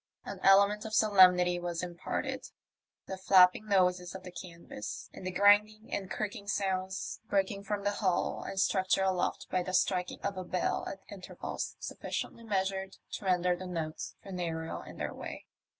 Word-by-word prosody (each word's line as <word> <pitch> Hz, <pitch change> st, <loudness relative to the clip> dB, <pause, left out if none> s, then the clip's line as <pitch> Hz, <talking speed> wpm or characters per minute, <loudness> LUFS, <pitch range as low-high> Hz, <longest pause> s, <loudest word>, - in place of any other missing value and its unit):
An -, -, -6 dB
element 200 Hz, +2 st, +5 dB
of 220 Hz, -1 st, -4 dB
solemnity 180 Hz, -4 st, +6 dB
was 175 Hz, 0 st, -3 dB
imparted 175 Hz, -1 st, -3 dB
to -, -, -10 dB, 0.6 s
the 190 Hz, -, -6 dB
flapping 185 Hz, +2 st, +5 dB
noises 180 Hz, -2 st, +2 dB
of 190 Hz, -, -8 dB
the 180 Hz, -, -8 dB
canvas 170 Hz, -, -8 dB
and 185 Hz, -, -7 dB
the -, -, 0 dB
grinding 205 Hz, +3 st, +4 dB
and 190 Hz, -2 st, -3 dB
creaking 205 Hz, -1 st, -4 dB
sounds 190 Hz, -1 st, -2 dB
breaking 200 Hz, 0 st, 0 dB
from 205 Hz, 0 st, -2 dB
the 205 Hz, -, +1 dB
hull 190 Hz, -4 st, 0 dB
and 195 Hz, -, -4 dB
structure 190 Hz, 0 st, +2 dB
aloft 185 Hz, -2 st, 0 dB
by 185 Hz, -, +2 dB
the 185 Hz, +1 st, -2 dB
striking 180 Hz, -1 st, +1 dB
of 200 Hz, -, -3 dB
a 185 Hz, -, -3 dB
bell 180 Hz, 0 st, -1 dB
at 195 Hz, -, -8 dB
intervals 195 Hz, -3 st, -6 dB
suflSciently 230 Hz, -, -5 dB
measured 190 Hz, -1 st, -1 dB
to 205 Hz, -, -6 dB
render 180 Hz, -1 st, +2 dB
the 185 Hz, +1 st, -7 dB
notes 165 Hz, -3 st, -4 dB
funereal 170 Hz, -4 st, -4 dB
in -, -, -11 dB
their -, -, -3 dB
way. -, -, -8 dB
190 Hz, 165 wpm, -31 LUFS, 180-200 Hz, 0.6 s, solemnity